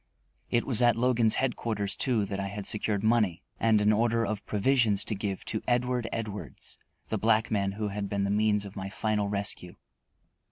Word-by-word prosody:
It 120 - +1
was 125 -3 +1
at 120 -1 +5
Logan's 120 -2 +2
headquarters, 110 -6 -1
too, 120 -6 +1
that 100 0 -4
I 100 - -2
had 100 0 -6
secured 105 -1 0
money 110 -6 +2 0.2
and 110 -2 +4
an 105 +1 +4
order 115 +1 +2
for 105 0 -3
provisions 110 -1 +3
to - - -2
give 100 -1 -4
to 110 - -2
Edward 125 -1 0
Edwards, 105 - -5 0.3
the 110 - -1
black 110 +1 +2
man 100 -2 0
who 105 0 -3
had 100 0 -4
been 100 -1 -1
the 100 - 0
means 105 0 +2
of 100 - -9
my 95 0 -5
final 105 0 -1
rescue. 100 -3 -2
105 Hz, 190 wpm, -28 LUFS, 100-115 Hz, 0.3 s, at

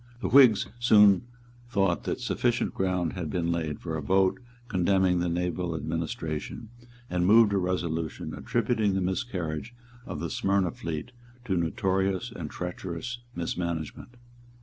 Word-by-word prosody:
The - - -2
Whigs 120 -6 +7
soon 105 -3 +6 0.4
thought 95 -6 +1
that - - -2
sufficient - - 0
ground 90 -3 0
had 85 -4 -4
been 85 -1 -1
laid 80 -3 -2
for 80 -2 -4
a 80 - -2
vote 95 - +2 0.3
condemning 95 -2 +2
the 90 0 0
naval 90 0 -1
administration, 80 +6 -4 0.4
and 90 -4 0
moved 110 0 +6
a 100 - +3
resolution 85 -4 -2
attributing 115 -4 0
the 95 - +1
miscarriage 95 0 -3 0.3
of - - -5
the - - -3
Smyrna 100 -7 +1
fleet 80 +5 -5 0.3
to 95 -6 0
notorious 95 +4 0
and 85 -9 -6
treacherous 90 +6 -5 0.2
mismanagement. 85 +6 -4
90 Hz, 135 wpm, -28 LUFS, 85-105 Hz, 0.4 s, Whigs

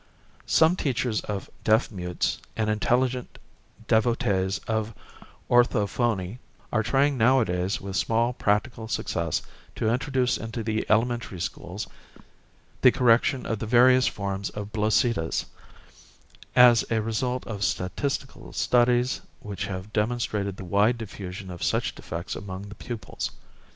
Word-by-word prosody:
Some 160 +3 +5
teachers 125 - -1
of 100 -2 -4 0.2
deaf 110 +2 +3
mutes 90 -3 -2 0.2
and 110 -1 +1
intelligent 125 +3 0 0.5
devotees 105 -4 +2
of 110 -1 -1 0.5
orthophony 120 -3 +2 0.3
are 110 - +3
trying 135 +4 +2
nowadays 110 -7 +2
with 95 -1 -6
small 115 +4 +1
practical 110 0 0
success 85 -7 -1 0.3
to 110 +1 +1
introduce 130 -1 0
into 115 0 -5
the 110 0 -1
elementary 115 -3 +1
schools 90 +3 -4 1.0
the 125 - +8
correction 125 +2 +3
of 115 - -2
the 110 - -4
various 125 +2 +6
forms 100 0 -3
of 105 0 -7
bloesitas, 110 -4 +1 1.1
as 125 -2 +7
a 115 - +1
result 120 +3 -2
of 105 -3 -4
statistical 135 +9 -2
studies 125 +1 +2 0.2
which 105 -2 -5
have 95 +2 -6
demonstrated 105 -3 -1
the 95 - -7
wide 105 +6 +3
diffusion 95 -3 -7
of 85 - -9
such - - 0
defects 85 +2 -6
among 95 0 -7
the - - -8
pupils. 110 -6 -5
110 Hz, 125 wpm, -26 LUFS, 100-120 Hz, 1.1 s, the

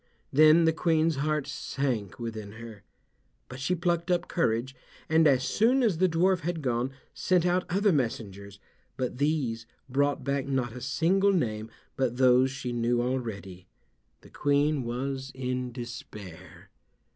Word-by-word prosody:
Then 155 +3 +6
the 160 - +3
Queen's 160 -2 +1
heart 150 0 0
sank 130 -7 -3
within 110 -4 -6
her, 115 -2 -10 0.7
but 130 - -9
she 175 +7 0
plucked 170 0 -1
up 175 -1 +1
courage, 130 -5 0 0.3
and 160 0 +4
as 130 -3 +3
soon 250 - +2
as 195 -9 +1
the 185 0 +4
dwarf 180 +3 +2
had 165 -1 -3
gone, 125 0 0 0.2
sent 180 -2 +1
out 180 +1 +1
other 200 +3 +2
messengers, 100 - -3 0.4
but 125 -1 -3
these 135 -7 -1 0.2
brought 140 +1 0
back 140 0 -1
not 130 -4 -1
a 125 - -8
single 180 +10 +2
name 110 - -1 0.3
but 125 -2 0
those 130 0 +5
she 130 -2 -5
knew 120 0 0
already. 110 -8 -4 0.5
The - - -17
Queen 145 0 +1
was 130 +3 -4
in 125 -1 -3
despair. 115 -7 -10
135 Hz, 145 wpm, -28 LUFS, 120-160 Hz, 0.7 s, Then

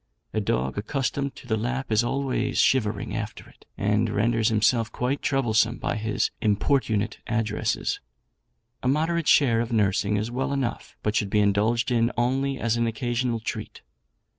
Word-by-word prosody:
A 110 - 0
dog 65 -4 -1
accustomed 135 +4 -2
to - - -13
the 110 -3 0
lap 130 +3 -3
is 110 +2 +4
always 135 0 -1
shivering 105 -5 +2
after 105 -1 -5
it, - - -21
and 105 +3 +1
renders 115 +2 +2
himself 110 +1 +2
quite 125 +5 -1
troublesome 115 -3 +2
by - - -2
his 110 -1 -1
importunate 110 -1 +1
addresses. 110 -1 -1 0.8
A - - -2
moderate 160 +4 +1
share 120 -6 +5
of 120 - -4
nursing 105 -1 +2
is 110 +3 -2
well 130 +3 -1
enough, 135 -4 -3
but 105 0 0
should 105 -2 +1
be 105 - +1
indulged 110 +4 +2
in 115 0 +2
only 135 +3 +1
as 115 -2 0
an 115 0 +1
occasional 120 +1 -1
treat. - - -6
115 Hz, 160 wpm, -25 LUFS, 105-130 Hz, 0.8 s, share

